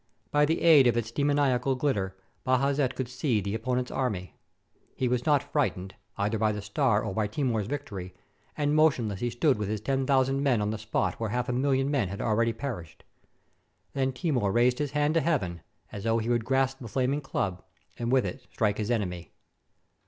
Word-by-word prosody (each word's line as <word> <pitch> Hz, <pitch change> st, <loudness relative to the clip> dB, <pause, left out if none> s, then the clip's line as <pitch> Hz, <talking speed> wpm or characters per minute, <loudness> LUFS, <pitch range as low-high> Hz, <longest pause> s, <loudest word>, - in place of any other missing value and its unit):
By 145 Hz, 0 st, +4 dB
the 160 Hz, +2 st, 0 dB
aid 155 Hz, -6 st, +7 dB
of 120 Hz, -, +2 dB
its 115 Hz, -1 st, -2 dB
demoniacal 135 Hz, -2 st, +1 dB
ghtter 105 Hz, -9 st, 0 dB, 0.3 s
Bajazet 135 Hz, +1 st, +1 dB
could 130 Hz, -, -3 dB
see 125 Hz, -2 st, 0 dB
the 100 Hz, 0 st, -3 dB
opponent's 125 Hz, +2 st, -1 dB
army. 105 Hz, -9 st, -2 dB, 0.6 s
He 130 Hz, -, 0 dB
was 125 Hz, +2 st, -1 dB
not 145 Hz, -1 st, +2 dB
frightened, 95 Hz, -10 st, 0 dB, 0.2 s
either 105 Hz, +2 st, 0 dB
by 110 Hz, 0 st, +2 dB
the 105 Hz, -, -4 dB
star 105 Hz, 0 st, +1 dB
or -, -, -3 dB
by 105 Hz, +1 st, 0 dB
Timur's 110 Hz, -3 st, -1 dB
victory, 100 Hz, -9 st, -5 dB, 0.4 s
and 145 Hz, -1 st, +1 dB
motionless 125 Hz, -11 st, +2 dB
he 120 Hz, -, -1 dB
stood 120 Hz, +1 st, +1 dB
with 105 Hz, -2 st, -2 dB
his 110 Hz, 0 st, -1 dB
ten 135 Hz, +4 st, -1 dB
thousand 135 Hz, 0 st, +2 dB
men 135 Hz, -5 st, +2 dB
on 105 Hz, 0 st, 0 dB
the 110 Hz, -, -4 dB
spot 110 Hz, 0 st, -1 dB
where 115 Hz, -2 st, -2 dB
half 125 Hz, +3 st, -2 dB
a -, -, 0 dB
million 135 Hz, +1 st, +1 dB
men 130 Hz, -9 st, +1 dB
had 100 Hz, +2 st, -6 dB
already 115 Hz, +1 st, +1 dB
perished. 115 Hz, -, -6 dB, 0.9 s
Then 135 Hz, -1 st, 0 dB
Timur 125 Hz, -, 0 dB
raised 125 Hz, +4 st, +3 dB
his 145 Hz, -1 st, -2 dB
hand 150 Hz, +1 st, +2 dB
to 165 Hz, -, +3 dB
heaven, 95 Hz, -, -1 dB, 0.3 s
as 100 Hz, -, -7 dB
though 115 Hz, 0 st, +2 dB
he 115 Hz, +1 st, -2 dB
would 120 Hz, -2 st, +1 dB
grasp 135 Hz, 0 st, +1 dB
the 120 Hz, -, -8 dB
flaming 135 Hz, +5 st, 0 dB
club, 95 Hz, -9 st, -3 dB, 0.4 s
and 120 Hz, 0 st, -1 dB
with 130 Hz, -1 st, +3 dB
it 130 Hz, -, -5 dB
strike 105 Hz, -2 st, 0 dB
his 105 Hz, 0 st, -2 dB
enemy. 90 Hz, -7 st, -2 dB
125 Hz, 195 wpm, -28 LUFS, 105-135 Hz, 0.9 s, aid